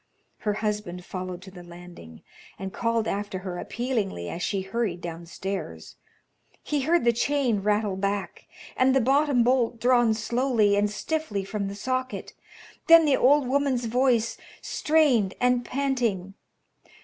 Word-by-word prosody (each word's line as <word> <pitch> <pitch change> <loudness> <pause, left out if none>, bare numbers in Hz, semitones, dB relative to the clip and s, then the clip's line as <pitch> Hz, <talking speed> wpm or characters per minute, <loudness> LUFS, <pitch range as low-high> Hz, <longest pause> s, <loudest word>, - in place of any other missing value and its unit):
Her 210 -2 -1
husband 210 -4 -3
followed 185 -1 -6
to 190 - -11
the 180 -1 -11
landing, 175 - -13 0.3
and 190 0 -6
called 230 -1 0
after 205 -1 -3
her 175 -2 -4
appealingly 220 - -3
as 170 - -6
she 195 +1 -1
hurried 195 -2 -2
downstairs. 170 - -6 0.7
He 295 -2 -1
heard 325 +1 +2
the 235 - +4
chain 250 -2 +1
rattle 210 0 0
back 200 +1 -3 0.3
and 260 +1 +3
the - - +5
bottom 270 0 +3
bolt 240 -1 +1
drawn 240 -2 +3
slowly 230 -2 +1
and 205 +1 +2
stiffly 215 -2 -3
from 200 +1 -3
the 200 - -6
socket. 255 +4 -3 0.5
Then 330 -1 +8
the 285 -3 +4
old 275 +1 +4
woman's 265 -2 +1
voice, 240 -1 +1 0.2
strained 275 -11 +2
and 250 0 +2
panting. 240 -9 -1
220 Hz, 140 wpm, -26 LUFS, 195-255 Hz, 0.7 s, Then